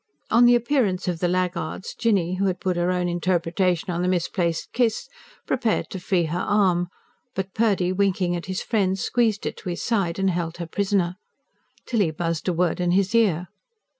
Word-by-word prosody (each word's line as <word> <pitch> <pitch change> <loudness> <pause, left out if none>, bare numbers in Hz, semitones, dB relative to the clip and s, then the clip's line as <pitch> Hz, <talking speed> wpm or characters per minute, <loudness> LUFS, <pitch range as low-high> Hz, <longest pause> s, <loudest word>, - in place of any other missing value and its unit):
On 235 +2 +6
the 240 0 +7
appearance 240 -7 +1
of 175 -2 -1
the 175 - +1
laggards, 180 -1 -2
Jinny, 195 -7 +1
who 195 - +1
had 185 -1 0
put 185 -1 -1
her 175 +1 +1
own 180 -1 0
interpretation 175 0 0
on 175 0 -1
the 180 - 0
misplaced 175 -2 -1
kiss, 235 -3 +1 0.4
prepared 240 -4 0
to 190 - -4
free 180 -1 +1
her 165 +2 -2
arm; 185 -4 +2 0.5
but 190 0 -3
Purdy, 200 -5 +2
winking 185 -2 +1
at 170 - -5
his 185 0 -3
friend, 195 -4 +1
squeezed 220 +1 0
it - - -3
to 190 - -6
his 175 - -4
side 195 -8 0
and 195 -1 +2
held 170 -1 -3
her 170 - -4
prisoner. 190 0 0 0.7
Tilly 210 -8 +1
buzzed 165 +1 -3
a 180 - +2
word 175 0 0
in 180 -1 +1
his 195 +2 +2
ear. 185 -7 +2
185 Hz, 190 wpm, -24 LUFS, 175-200 Hz, 0.7 s, the